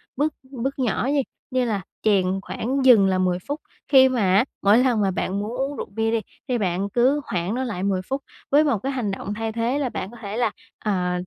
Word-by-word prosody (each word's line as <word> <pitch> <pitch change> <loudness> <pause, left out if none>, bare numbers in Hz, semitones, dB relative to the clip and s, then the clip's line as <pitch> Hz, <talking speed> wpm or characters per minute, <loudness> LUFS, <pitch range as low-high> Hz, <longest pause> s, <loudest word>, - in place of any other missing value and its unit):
bước 295 +3 0 0.2
bước 270 +1 -3
nhỏ 250 0 0
nhi, 285 -2 +2 0.3
như 255 -1 +1
là 210 -4 -1 0.2
chèn 200 -4 +3 0.2
khoảng 260 +6 -2
dừng 225 -7 +7
là 190 -1 +2
10 180 -1 +1
phút, 290 +2 -3 0.3
khi 265 -2 +7
mà 255 -3 0
á 195 +2 +4 0.2
mỗi 200 +3 +5
lần 245 -3 +3
mà 195 -1 +2
bạn 190 +1 -2
muốn 210 +2 -3
uống 275 +2 -2
rượu - - -4
bia 225 +2 0
đi 230 - +2 0.3
thì 250 -2 +1
bạn 195 -1 -1
cứ 255 +7 +2
hoãn 180 +3 -2
nó 260 - -1
lại 210 -7 -3
10 195 -2 +1
phút 270 +1 -1 0.3
với 290 +2 +6
một 280 -7 +2
cái 270 - -1
hành 245 -7 -2
động 195 +1 -4
thay 225 +1 -3
thế 235 +5 0
là 270 -3 0
bạn 190 -3 -5
có 240 - -12
thể 205 0 -5
là, 235 -3 +1 0.3
ờ, 180 -4 0
225 Hz, 240 wpm, -23 LUFS, 200-260 Hz, 0.3 s, dừng